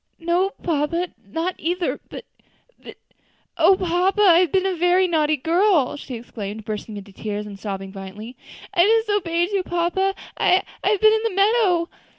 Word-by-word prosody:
"No, 345 +3 +1
papa, 335 +2 -1 0.2
not 330 - -2
either; 350 +2 -2
but - - -9 0.6
but, - - -12 0.6
O 385 - +5
papa! 370 +3 0
I 345 -4 +7
have 360 -2 +2
been 380 -1 +1
a 380 -1 0
very 355 +2 +3
naughty 310 -3 +1
girl," 330 -1 +2
she 270 -3 -8
exclaimed, 215 -2 -7
bursting 215 0 -5
into 200 0 -10
tears, 210 +1 -5
and 200 -2 -10
sobbing 195 -2 -5
violently. 200 +5 -9 0.4
"I 440 +6 +4
disobeyed 355 -4 0
you, 395 -2 +1
papa. 355 +2 -1 0.2
I 375 +1 +3 0.2
I - - +2
have 415 -2 +1
been 435 0 +6
in 440 - +1
the 455 -5 -2
meadow." 395 -4 +3
345 Hz, 165 wpm, -22 LUFS, 245-380 Hz, 0.6 s, I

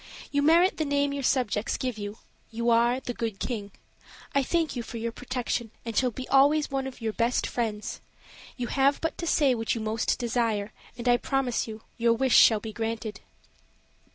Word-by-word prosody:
You 285 - +2
merit 335 +4 +4
the 315 - 0
name 285 -1 +1
your 280 - -3
subjects 245 -5 0
give 250 -4 -3
you: 205 +1 -5 0.3
you 235 +1 0
are 235 +2 +3
the 250 -2 -5
Good 225 -4 -3
King. 205 -5 -4 0.6
I 280 - +3
thank 325 +3 0
you 245 - -2
for 230 0 -7
your 230 +1 -3
protection, 245 -1 -3 0.2
and 230 -1 -4
shall 255 +2 +3
be 255 +2 -7
always 290 +2 +4
one 270 -1 -1
of 260 -2 -9
your 220 -1 -2
best 235 +3 +1
friends. 215 -3 -3 0.6
You 250 - -2
have 275 +3 +2
but 325 - -2
to 340 - -3
say 285 -5 +3
what 225 -1 -1
you - - -3
most 220 +1 0
desire, 225 -4 -1 0.2
and 240 0 -5
I 245 0 +5
promise 260 -2 -1
you 220 0 -8 0.2
your 230 0 +4
wish 260 +2 +2
shall 220 -2 +7
be 220 +1 -7
granted." 225 -1 -4
240 Hz, 195 wpm, -27 LUFS, 225-270 Hz, 0.6 s, shall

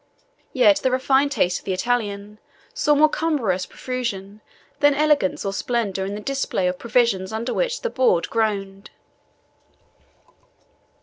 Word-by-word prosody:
Yet 305 -12 +4
the 265 - 0
refined 265 +2 +2
taste 180 -10 +1
of - - -23
the 190 - -1
Italian 210 -1 -2 0.3
saw 475 -12 +2
more 305 +2 +6
cumbrous 275 - -1
profusion 215 -5 -5 0.4
than 290 -1 +4
elegance 295 -12 +1
or 195 - -2
splendour 200 -4 -2
in 200 - -4
the 210 - -6
display 270 -7 -1
of 180 0 -2
provisions 225 -5 +1
under 225 +3 -3
which - - -1
the 480 - 0
board 250 -10 +2
groaned. 200 -3 -2
230 Hz, 135 wpm, -22 LUFS, 195-275 Hz, 0.4 s, more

